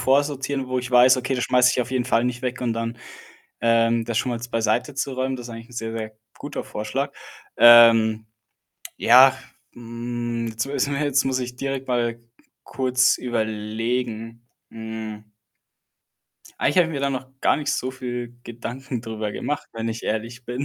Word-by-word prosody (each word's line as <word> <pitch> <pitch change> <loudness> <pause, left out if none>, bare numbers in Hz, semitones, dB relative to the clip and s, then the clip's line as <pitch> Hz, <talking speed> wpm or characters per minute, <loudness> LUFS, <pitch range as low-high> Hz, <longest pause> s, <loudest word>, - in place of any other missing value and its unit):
vorsortieren, 140 0 +1
wo 130 0 -1
ich 125 0 -5
weiß: 125 +1 +6
„Okay, 125 +1 -2
das 125 - -1
schmeiße 125 0 +4
ich - - +1
auf 120 - -9
jeden 130 -2 0
Fall 115 -2 +2
nicht 125 -1 -2
weg 125 0 -3
und 120 -2 0
dann, 115 +1 -3 0.6
ähm, 115 0 +2
das 115 -1 -2
schon 125 - 0
mal 120 - -2
jetzt 120 +1 -9
beiseite 115 +3 0
zu 135 0 -2
räumen.“ 130 +1 -1
Das 120 -2 -8
ist - - -11
eigentlich 115 +2 -11
sehr 115 -1 -4
sehr 110 -1 -5 0.2
guter - - -6
Vorschlag. 110 +7 -3 0.5
Ähm, 115 -2 +7 0.7
ja, 130 +2 +7 0.4
hm, 120 0 -4
jetzt 110 +2 -3
mu 140 - -6 0.2
jetzt 140 -1 +1
muss 130 -1 0
ich 125 0 -5
direkt 135 0 -4
mal 120 -2 0
k - - -27 0.4
kurz 130 0 +2
überlegen, 115 0 -3 0.2
hm 110 -1 -7 1.4
eigentlich 145 - +1
habe 175 - +5
ich - - -6
mir 140 - -2
da 140 0 0
noch 130 -1 -5
gar - - +3
nicht 145 0 -2
so 130 -2 -2
viel 120 -2 -6
Gedanken 120 +2 -6
drüber 110 -2 -4
gemacht, 145 +7 -4
wenn 115 0 -4
ich 115 0 -5
ehrlich 115 +3 -4
bin. 125 +3 -3
120 Hz, 175 wpm, -23 LUFS, 115-130 Hz, 1.4 s, Ähm